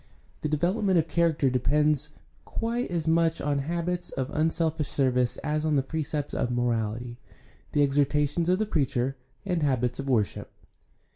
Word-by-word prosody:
The 155 Hz, -, -1 dB
development 185 Hz, +5 st, +1 dB
of 165 Hz, -1 st, +2 dB
character 160 Hz, -5 st, +2 dB
depends 150 Hz, +3 st, +2 dB, 0.3 s
quite 235 Hz, +2 st, -2 dB
as 170 Hz, -3 st, -2 dB
much 165 Hz, 0 st, +3 dB
on 145 Hz, -1 st, 0 dB
habits 175 Hz, +4 st, -2 dB
of 135 Hz, +1 st, -3 dB
unselfish 160 Hz, -1 st, 0 dB
service 125 Hz, -3 st, +1 dB
as 150 Hz, +1 st, 0 dB
on 155 Hz, -1 st, +1 dB
the 135 Hz, -, +2 dB
precepts 150 Hz, 0 st, -3 dB
of 125 Hz, -, 0 dB
morality, 120 Hz, -1 st, -1 dB, 0.5 s
the 145 Hz, -, +4 dB
exhortations 145 Hz, +4 st, +1 dB
of 185 Hz, -, +4 dB
the 215 Hz, -, 0 dB
preacher, 135 Hz, -, 0 dB, 0.3 s
and 180 Hz, -4 st, 0 dB
habits 125 Hz, -4 st, 0 dB
of 135 Hz, 0 st, -3 dB
worship. 110 Hz, -7 st, 0 dB
150 Hz, 150 wpm, -27 LUFS, 130-165 Hz, 0.5 s, the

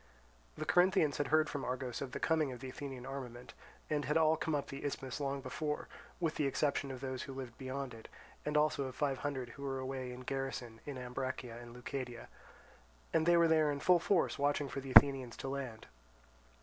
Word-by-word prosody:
The -, -, -3 dB
Corinthians 175 Hz, -5 st, +4 dB
had 145 Hz, -, 0 dB
heard 155 Hz, 0 st, +4 dB
from 145 Hz, -2 st, -4 dB
Argos 125 Hz, -1 st, -3 dB
of 135 Hz, -2 st, -4 dB
the -, -, -4 dB
coming 160 Hz, -4 st, +2 dB
of 125 Hz, -, -7 dB
the 130 Hz, -, -6 dB
Athenian 130 Hz, -2 st, -6 dB
armament, 125 Hz, -3 st, -7 dB, 0.3 s
and 150 Hz, -2 st, 0 dB
had 150 Hz, +4 st, +2 dB
all 160 Hz, 0 st, +5 dB
come 160 Hz, -1 st, -1 dB
up 145 Hz, -, -1 dB
to -, -, -5 dB
the 140 Hz, -, -7 dB
Isthmus 135 Hz, -2 st, -3 dB
long 140 Hz, -1 st, -1 dB
before, 150 Hz, +3 st, -3 dB, 0.3 s
with 165 Hz, -3 st, 0 dB
the 145 Hz, -, +2 dB
exception 140 Hz, +1 st, +1 dB
of 130 Hz, -1 st, -6 dB
those 130 Hz, -2 st, -3 dB
who 135 Hz, -1 st, -6 dB
lived 130 Hz, -3 st, -6 dB
beyond 130 Hz, -1 st, -4 dB
it, 110 Hz, -1 st, -10 dB, 0.4 s
and 150 Hz, 0 st, 0 dB
also 150 Hz, -2 st, +3 dB
of 130 Hz, -1 st, -6 dB
five 140 Hz, -3 st, 0 dB
hundred 135 Hz, -4 st, -3 dB
who 140 Hz, -, -11 dB
were 135 Hz, -1 st, -2 dB
away 130 Hz, -1 st, -4 dB
in 125 Hz, +1 st, -8 dB
garrison 130 Hz, -3 st, -4 dB
in 140 Hz, -2 st, -4 dB
Ambracia 125 Hz, -1 st, -4 dB
and 120 Hz, -1 st, -10 dB
Leucadia; 125 Hz, -1 st, -5 dB, 0.8 s
and 160 Hz, +1 st, +3 dB
they 175 Hz, 0 st, +7 dB
were 170 Hz, 0 st, +6 dB
there 155 Hz, -2 st, +4 dB
in 140 Hz, -, -2 dB
full 180 Hz, +3 st, +5 dB
force 175 Hz, -2 st, +2 dB
watching 145 Hz, 0 st, +2 dB
for 135 Hz, -, -3 dB
the 135 Hz, 0 st, -7 dB
Athenians 130 Hz, -3 st, +7 dB
to -, -, -5 dB
land. 135 Hz, -5 st, -4 dB
135 Hz, 215 wpm, -35 LUFS, 130-150 Hz, 0.8 s, they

